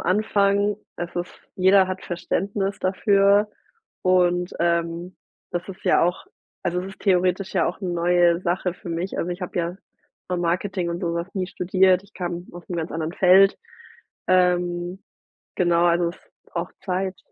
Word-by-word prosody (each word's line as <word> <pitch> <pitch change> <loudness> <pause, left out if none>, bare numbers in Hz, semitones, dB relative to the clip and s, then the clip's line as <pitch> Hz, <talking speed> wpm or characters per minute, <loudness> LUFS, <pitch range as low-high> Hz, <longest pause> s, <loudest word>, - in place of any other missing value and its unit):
Anfang, 200 0 +2 0.2
es 175 0 -5
ist 175 0 -4 0.2
jeder 190 +1 +5
hat 185 0 -5
Verständnis 195 +3 -2
dafür 200 +2 +3 0.5
und, 180 -1 +2
ähm, 170 +1 -1 0.3
das 175 +1 -3
ist 190 -1 -10
ja - - +4
auch 175 +1 0 0.4
also, 180 +1 0
es 190 - -6
ist 195 - -13
theoretisch 185 0 +1
ja 170 -4 +3
auch 175 - -4
'ne 185 - -3
neue 175 0 +3
Sache 180 0 -1
für 175 - -11
mich. 170 +3 -3
Also, 175 - -1
ich 175 - -5
habe 180 0 -6
ja 170 +2 -2 0.5
vom 180 -1 -1
Marketing 175 +1 -1
und 170 +1 -4
sowas 170 0 -2
nie 185 -1 -1
studiert, 185 0 +2
ich 200 - -22
kam 175 -1 -4
aus 175 -1 -11
'nem 175 - -3
ganz 165 0 -3
anderen 160 0 -3
Feld. 195 +2 +6 0.7
Ähm, 180 0 +1 0.5
genau, 175 -1 +3
also, 170 0 +3
es 175 - -14 0.3
braucht 170 +1 -5
Zeit. 190 0 -2
180 Hz, 165 wpm, -23 LUFS, 175-190 Hz, 0.7 s, Feld